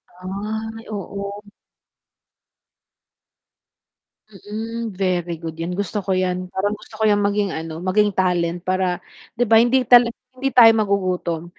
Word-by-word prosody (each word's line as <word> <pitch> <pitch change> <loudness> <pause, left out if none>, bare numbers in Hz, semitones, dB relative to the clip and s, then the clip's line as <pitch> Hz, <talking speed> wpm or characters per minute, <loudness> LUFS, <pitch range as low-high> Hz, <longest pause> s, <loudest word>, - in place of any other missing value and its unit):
Ay 215 +4 -5
oo. 200 0 -5 3.0
Mm, 220 +3 -6
very 175 -3 -2
good 165 -1 -6
yan, 165 +2 -4
gusto 200 +2 -3
ko 195 - -2
yan 185 0 -1
parang 205 +2 -1
gusto 215 +1 -14
ko - - 0
yan 205 -1 +3
maging, 200 0 +1
ano, 160 0 -6
maging 205 +3 +2
talent 175 -2 0
para, 185 -1 0 0.4
'di 245 - +2
ba? 225 - +5
Hindi 245 +3 +4
ta 245 -1 +8 0.3
hindi 270 +1 -1
tayo 235 -2 +8
magugutom 185 -5 0
200 Hz, 130 wpm, -21 LUFS, 180-215 Hz, 3.0 s, ta